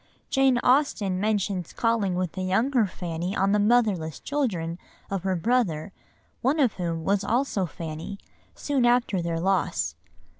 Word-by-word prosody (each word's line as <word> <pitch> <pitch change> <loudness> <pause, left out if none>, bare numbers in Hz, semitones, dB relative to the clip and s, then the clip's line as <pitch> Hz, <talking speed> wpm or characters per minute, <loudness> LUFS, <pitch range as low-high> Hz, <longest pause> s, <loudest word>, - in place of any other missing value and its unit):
Jane 270 -2 +4
Austen 245 -9 +2
mentions 200 -4 -1
calling 225 -5 +1
with 180 -2 -1
the 190 - -5
younger 225 +5 +2
Fanny 175 +1 -4
on 195 +1 +2
the 210 - +3
motherless 205 - +2
children 185 - -2 0.3
of 195 -2 -1
her 190 0 0
brother, 190 -4 0 0.5
one 275 +6 +1
of 255 -6 +3
whom 165 -3 -3
was 200 +3 +1
also 220 -3 0
Fanny, 160 +4 -6 0.4
soon 280 -3 0
after 240 -6 +2
their 170 -1 -2
loss. 165 - 0
195 Hz, 145 wpm, -26 LUFS, 175-240 Hz, 0.5 s, Jane